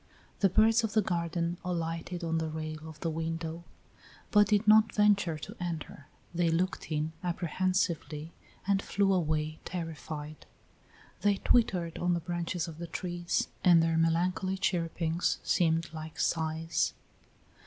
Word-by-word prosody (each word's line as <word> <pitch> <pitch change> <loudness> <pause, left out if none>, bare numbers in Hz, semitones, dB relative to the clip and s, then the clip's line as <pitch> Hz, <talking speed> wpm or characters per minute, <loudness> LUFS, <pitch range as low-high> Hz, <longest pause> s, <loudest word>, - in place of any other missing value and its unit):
The 195 - +4
birds 220 +4 +4
of 220 -2 -1
the 215 -1 +3
garden 170 -1 -1
alighted 170 0 -3
on 165 -1 0
the 160 0 -2
rail 155 0 -5
of 155 -1 -12
the 165 - 0
window, 165 +1 -4 0.7
but 205 -1 +6
did 210 +1 +2
not 215 +1 +6
venture 200 -6 +3
to 155 - -8
enter; 165 -4 -5 0.3
they 170 -1 +2
looked 175 +1 -1
in 155 +1 0
apprehensively 170 -2 -1 0.3
and 195 0 +2
flew 195 -1 +1
away 155 -3 0
terrified; 155 -3 -6 0.7
they 205 -1 +3
twittered 180 -9 +2
on 175 0 +2
the - - 0
branches 175 0 -3
of 165 -1 -9
the 170 - -5
trees, 175 +1 -2
and 170 -3 +6
their 165 0 +1
melancholy 180 +3 +1
chirpings 170 -2 0
seemed 165 -1 +1
like 155 0 -7
sighs. 160 0 0
170 Hz, 140 wpm, -30 LUFS, 160-185 Hz, 0.7 s, but